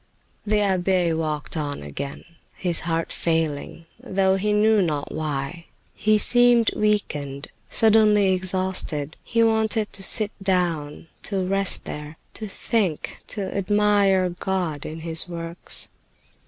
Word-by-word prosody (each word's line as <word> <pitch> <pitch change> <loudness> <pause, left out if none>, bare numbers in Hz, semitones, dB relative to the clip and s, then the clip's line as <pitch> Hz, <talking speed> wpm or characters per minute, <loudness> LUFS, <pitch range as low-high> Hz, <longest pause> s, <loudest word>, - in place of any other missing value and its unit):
The 210 0 +3
abbe 185 -3 +2
walked 155 -1 -3
on 145 - -3
again, 75 - -6 0.3
his 175 -3 -1
heart 165 0 -1
failing, 165 -1 -2
though 190 0 +1
he 205 +2 0
knew 210 0 +4
not 150 -5 -2
why. 155 +2 -4 0.3
He 215 0 +2
seemed 245 +1 +4
weakened, 150 -10 -1 0.2
suddenly 210 -3 +5
exhausted; 185 -5 -1
he 230 -1 +1
wanted 220 -1 +1
to 195 - -4
sit 210 +2 +3
down, 175 -7 0 0.2
to 195 -3 -1
rest 195 +1 +1
there, 150 +1 -7 0.2
to 215 - -5
think, 195 -5 -2
to 200 -3 -4
admire 200 -2 +3
God 175 -4 -3
in 160 +1 -7
His 165 +2 -2
works. 170 0 -3
185 Hz, 125 wpm, -23 LUFS, 160-210 Hz, 0.3 s, suddenly